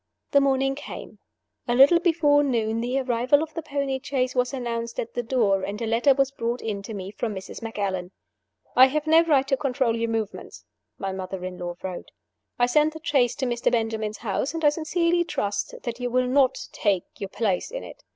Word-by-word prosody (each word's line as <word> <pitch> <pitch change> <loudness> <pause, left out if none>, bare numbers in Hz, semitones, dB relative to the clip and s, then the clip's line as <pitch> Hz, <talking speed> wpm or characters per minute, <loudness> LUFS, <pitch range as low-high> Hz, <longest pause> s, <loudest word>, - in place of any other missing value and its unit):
The 280 - +5
morning 270 0 +2
came. 285 - -9 0.5
A 240 - +1
little 280 +7 +7
before 310 -4 +3
noon 230 -4 0
the 250 +3 0
arrival 255 +4 +2
of 315 -1 -8
the 330 - -4
pony 280 -3 -2
chaise 255 -2 -1
was 250 -1 +1
announced 235 -3 -4
at 230 - -4
the 245 - -1
door, 225 -5 +1
and 200 +2 -4
a 230 - -2
letter 235 +5 +3
was 275 0 +2
brought 240 -2 -2
in 210 -3 -4
to 210 +2 -7
me 190 0 -6
from 215 0 -3
Mrs. 190 +4 -8
Macallan. 200 -5 -3 0.7
"I 260 +1 +9
have 300 +3 -2
no 320 +1 +6
right 280 -5 +3
to 275 - +2
control 260 -4 0
your 230 0 -1
movements," 200 - -4 0.3
my 195 - -3
mother 190 -1 -5
in 185 -1 -6
law 175 -1 -4
wrote. 185 -2 -6 0.5
"I 245 - +4
send 300 +5 +3
the 320 - -9
chaise 270 -7 +2
to 265 - -2
Mr. 240 -1 0
Benjamin's 220 -2 -1
house; 235 +8 -2
and 325 -1 -1
I - - +8
sincerely 335 +3 +1
trust 205 -11 -2
that 240 0 -4
you 245 0 -2
will 255 +1 +2
not 265 0 +3
take 200 -5 +1 0.2
your 195 - -4
place 200 -4 -1
in - - -6
it. - - -11
245 Hz, 210 wpm, -25 LUFS, 220-280 Hz, 0.7 s, I